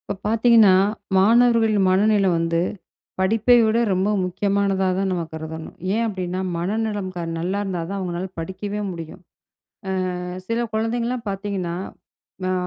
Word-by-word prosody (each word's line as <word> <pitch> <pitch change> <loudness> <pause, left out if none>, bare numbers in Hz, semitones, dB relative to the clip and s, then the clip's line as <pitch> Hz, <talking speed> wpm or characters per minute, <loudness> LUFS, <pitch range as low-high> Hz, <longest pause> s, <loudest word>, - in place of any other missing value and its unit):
இப்ப - - 0
பாத்தீங்கன்னா, 225 -3 +5 0.4
மாணவர்களின் 225 0 +4
மனநிலை 200 +1 +3
வந்து 165 0 0 0.6
படிப்பை 225 +5 +4
விட 220 +1 +2
ரொம்ப 190 +2 +1 0.2
முக்கியமானதா 195 +1 0
தான் 195 0 0
நம்ம 175 -2 -1
கருதணும். 160 0 -7 0.2
ஏன் 230 - +1
அப்டின்னா, 185 -3 -3 0.2
மனநலம் 205 +1 -2 0.3
நல்லா 185 +4 -1
இருந்தாதான் 185 0 -3
அவங்களால 180 0 -4
படிக்கவே 190 +5 -4
முடியும். 165 +1 -8 1.0
அ, - - -5 0.3
சில 230 +1 -1 0.2
குழந்தைங்கலாம் 235 +2 -1
பார்த்தீங்கன்னா, 195 -3 -3 0.7
அ - - +1
195 Hz, 120 wpm, -22 LUFS, 180-220 Hz, 1.0 s, பாத்தீங்கன்னா